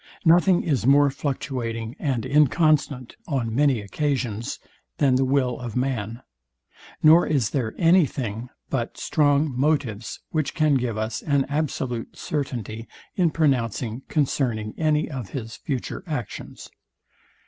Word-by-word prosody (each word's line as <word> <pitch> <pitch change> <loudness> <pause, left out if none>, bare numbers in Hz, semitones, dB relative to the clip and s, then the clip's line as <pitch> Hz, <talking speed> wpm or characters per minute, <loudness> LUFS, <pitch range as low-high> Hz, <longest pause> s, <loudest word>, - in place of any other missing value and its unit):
Nothing 175 +2 +5
is 135 -6 0
more 140 0 +5
fluctuating 125 -5 -3
and 130 -7 -1
inconstant 145 -2 +2
on 120 -6 -1
many 135 -3 +3
occasions, 120 -1 -2 0.4
than 135 -3 +3
the 130 +1 +3
will 130 -2 +1
of 120 -3 -6
man; 125 -3 -2 0.8
nor 160 +3 +7
is 135 -8 +1
there 120 -6 -2
any 170 -1 +5
thing 120 -1 -5 0.2
but 120 -4 -2
strong 145 -1 +2
motives, 130 -6 -1
which 155 -3 -1
can 155 -2 +3
give 120 -4 0
us 110 +1 -2
an 140 -3 +1
absolute 135 -5 -3
certainty 120 -6 -4 0.3
in 180 -3 +3
pronouncing 125 -6 0
concerning 125 -7 0
any 155 -1 +1
of 130 -9 -6
his 115 0 -6
future 135 +4 -4
actions. 145 -7 -6
135 Hz, 125 wpm, -24 LUFS, 115-150 Hz, 0.8 s, nor